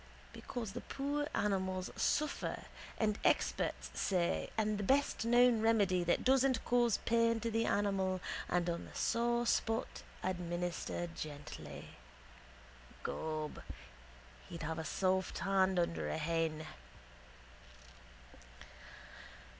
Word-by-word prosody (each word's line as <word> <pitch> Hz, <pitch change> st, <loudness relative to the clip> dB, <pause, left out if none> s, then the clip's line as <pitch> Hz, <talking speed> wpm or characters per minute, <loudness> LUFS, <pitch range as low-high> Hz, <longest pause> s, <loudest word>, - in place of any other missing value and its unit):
Because 235 Hz, -5 st, -5 dB
the -, -, -5 dB
poor 290 Hz, +2 st, -2 dB
animals 190 Hz, -2 st, 0 dB
suffer 305 Hz, 0 st, 0 dB, 0.3 s
and 215 Hz, -2 st, +1 dB
experts -, -, +1 dB
say 170 Hz, -, 0 dB
and 215 Hz, -1 st, +1 dB
the -, -, -1 dB
best 270 Hz, 0 st, +2 dB
known 240 Hz, -1 st, +5 dB
remedy 200 Hz, -5 st, +3 dB
that 175 Hz, -, +1 dB
doesn't 260 Hz, -2 st, +3 dB
cause 240 Hz, -3 st, +3 dB
pain 230 Hz, 0 st, +3 dB
to 230 Hz, -, -1 dB
the 225 Hz, +1 st, +1 dB
animal 195 Hz, -2 st, +1 dB, 0.3 s
and 175 Hz, 0 st, +1 dB
on 170 Hz, -1 st, -2 dB
the -, -, -13 dB
sore 235 Hz, 0 st, +1 dB
spot 225 Hz, -1 st, 0 dB, 0.2 s
administer 175 Hz, -1 st, -2 dB
gently. 150 Hz, -2 st, -7 dB, 1.1 s
Gob, 155 Hz, -1 st, -3 dB, 0.9 s
he'd 170 Hz, -2 st, -6 dB
have 160 Hz, +1 st, -2 dB
a -, -, -3 dB
soft 190 Hz, +1 st, 0 dB
hand 190 Hz, -1 st, +2 dB
under 170 Hz, -1 st, 0 dB
a -, -, -1 dB
hen. 160 Hz, 0 st, -1 dB
195 Hz, 110 wpm, -35 LUFS, 175-230 Hz, 1.1 s, known